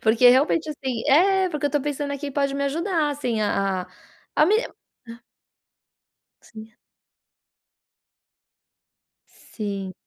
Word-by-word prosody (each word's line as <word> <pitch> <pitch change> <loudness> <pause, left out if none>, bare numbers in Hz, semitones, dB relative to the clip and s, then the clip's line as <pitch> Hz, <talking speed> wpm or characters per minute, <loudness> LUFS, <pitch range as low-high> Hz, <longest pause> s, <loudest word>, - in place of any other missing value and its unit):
porque, 225 +3 +5
realmente, 295 +5 +3
assim 265 -6 -4
é, 380 +6 +4
porque 300 -3 -2
eu - - -2
tô 290 - 0
pensando 285 0 -3
que 285 0 -5
pode 280 0 -1
me 280 0 -1
ajudar, 320 +1 -1
assim, 250 -6 -2
a 195 -3 -1 0.5
a 305 - +5
me 410 +7 +3 0.5
hã. 230 0 -11 1.2
Sim. 220 0 -13 2.5
Sim. 200 -3 -7
280 Hz, 115 wpm, -23 LUFS, 225-300 Hz, 2.5 s, porque